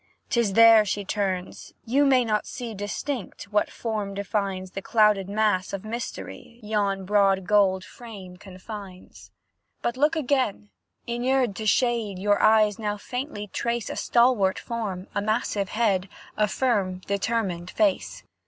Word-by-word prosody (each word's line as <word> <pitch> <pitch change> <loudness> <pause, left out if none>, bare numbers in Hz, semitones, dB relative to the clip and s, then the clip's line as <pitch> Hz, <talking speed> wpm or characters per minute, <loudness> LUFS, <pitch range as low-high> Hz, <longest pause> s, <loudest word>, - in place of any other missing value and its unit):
'Tis 235 -6 +1
there 230 0 +8
she 205 0 -3
turns; 190 -3 -3
you 280 +5 +3
may 255 -2 +4
not 215 -1 0
see 240 -4 -6
Distinct, 205 +3 -5
what 210 - +2
form 210 -4 -4
defines 195 -2 -2
The 195 - -5
clouded 210 -3 +3
mass 205 -3 +1
of 195 +1 -5
mystery 235 +1 -7
Yon 200 -2 -1
broad 195 -1 +3
gold 190 -2 +3
frame 200 -7 -11
confines. 190 0 -11 0.5
But 235 +1 -1
look 300 +4 +3
again; 255 -8 -1 0.3
inured 245 -2 0
to 220 - -3
shade 230 -3 +1
Your 205 +2 +1
eyes 215 -1 +4
now 210 -1 -2
faintly 250 -1 -5
trace 235 -1 -2
A - - -5
stalwart 235 -6 +3
form, 205 -6 -4
a 205 - 0
massive 210 -2 -1
head, 200 -4 +1 0.3
A 210 - +2
firm, 200 -7 0
determined 200 -4 -1
face. 305 +5 0
210 Hz, 140 wpm, -25 LUFS, 195-235 Hz, 0.5 s, there